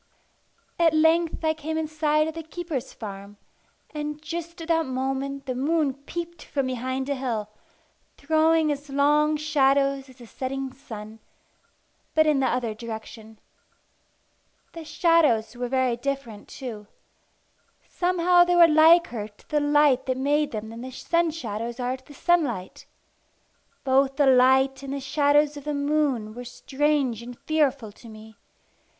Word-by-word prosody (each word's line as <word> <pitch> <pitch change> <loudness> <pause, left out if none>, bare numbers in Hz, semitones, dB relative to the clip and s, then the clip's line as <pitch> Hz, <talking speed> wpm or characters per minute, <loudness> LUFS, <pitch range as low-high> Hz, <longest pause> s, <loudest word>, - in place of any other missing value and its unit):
At 330 -2 +4
length 320 +1 +2
I 315 - +3
came 315 +1 -4
in 320 -1 -1
sight 305 0 +1
of 320 - -4
the 330 - -6
keeper's 320 -4 -5
farm; 200 -1 -9 0.6
and 300 0 -4
just 335 +2 -6
at 330 0 -8
that 325 -2 +2
moment 270 +1 -3
the 255 - -2
moon 290 +2 0
peeped 335 +4 -7
from 275 -2 -2
behind 260 +1 -3
a 285 - 0
hill, 235 -6 -3 0.7
throwing 315 +1 +2
as 285 0 -5
long 295 +2 +2
shadows 275 -2 +1
as 260 - -16
the 245 - -13
setting 265 +2 -5
sun, 220 -4 -10 1.0
but 315 0 +5
in 300 -3 +3
the 265 - +2
other 240 -3 -1
direction. 220 0 -9 1.4
The 330 - -8
shadows 305 -9 +2
were 245 0 -4
very 260 -2 +1
different 245 -5 -5
too. 220 -6 -8 1.0
Somehow 355 0 +3
they 355 0 +1
were 340 -1 +8
liker 315 -8 +4
to 210 -1 -25
the 300 - +1
light 290 -3 +3
that 255 -1 0
made 290 +3 +1
them 220 0 -6
than 230 +1 -9
the 260 - -6
sun 335 +6 0
shadows 235 -5 -5
are 250 +1 -2
to 260 - -23
the 290 - -15
sunlight. 275 - -1 1.0
Both 270 0 +2
the 290 - +3
light 265 +1 +4
and 275 0 -6
the - - -3
shadows 290 +2 +2
of 290 - -9
the 300 -1 -2
moon 285 -7 0
were 245 +2 -8
strange 265 -1 -1
and 240 0 -9
fearful 280 -8 0
to 230 +3 -15
me. 220 0 -13
275 Hz, 155 wpm, -25 LUFS, 245-310 Hz, 1.4 s, were